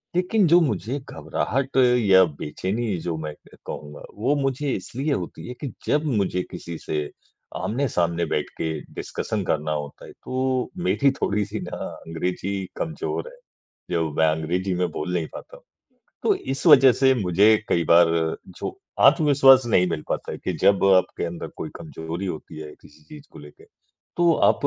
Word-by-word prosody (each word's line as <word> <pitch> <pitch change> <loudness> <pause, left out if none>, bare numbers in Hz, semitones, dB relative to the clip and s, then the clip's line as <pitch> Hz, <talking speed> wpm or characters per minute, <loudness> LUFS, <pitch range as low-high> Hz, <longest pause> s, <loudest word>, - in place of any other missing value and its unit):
लेकिन 185 +2 +2
जो 170 +2 +6
मुझे 125 - -1
घबराहट 130 - -3 0.2
या 95 -5 +6 0.2
बेचैनी 100 +8 -2
जो 85 -1 -3
मैं 75 -1 -5
क - - -21
कहूँगा, 75 -1 -8
वो 125 +8 +1
मुझे 135 0 -1
इसीलिए 135 +10 -3
होती - - -5
है 125 - -5
कि, 140 -4 -4 0.2
जब 150 +1 +2
मुझे 100 -9 0
किसी 85 -1 -7
से 75 -2 -3 0.5
आमने-सामने 90 - 0
बैठ 75 -1 -2
के 80 - -2 0.3
डिस्कशन 105 -2 -3
करना 75 -3 -1
होता 75 -2 -5
है - - -11
तो 130 -1 -2
मेरी 140 -5 +3
थोड़ी-सी 105 -5 -2
ना - - -6 0.3
अंग्रेज़ी 90 +4 -3
कमज़ोर 160 - -3
है, - - -11 0.6
जो 80 -2 0
मैं 80 - +3
अंग्रेज़ी 85 +4 -1
में 90 0 0
बोल 90 +5 -4
नहीं 85 -3 0
पाता - - -10
हूँ। - - -21 0.6
तो 415 - +3
इस 135 - -4
वजह 135 -5 +8
से 130 +2 +4
मुझे 105 0 +4
कई 85 -1 +2
बार 85 +1 +6 0.5
जो - - -5 0.3
आत्मविश्वास 135 -5 +6
नहीं 90 -6 +3
मिल 75 - -3
पाता - - -3
है - - -6
कि - - -1
जब 100 -1 +4
आपके 95 - 0
अंदर 85 0 -5
कोई - - -5
कमज़ोरी 80 +4 -6
होती 80 -3 -6
है 75 -1 -8
किसी 75 +1 -19
चीज़ 150 - -13
को - - -12
लेके, 75 0 -14 0.5
तो 175 -1 +4
आप - - +3
100 Hz, 170 wpm, -24 LUFS, 85-135 Hz, 0.6 s, वजह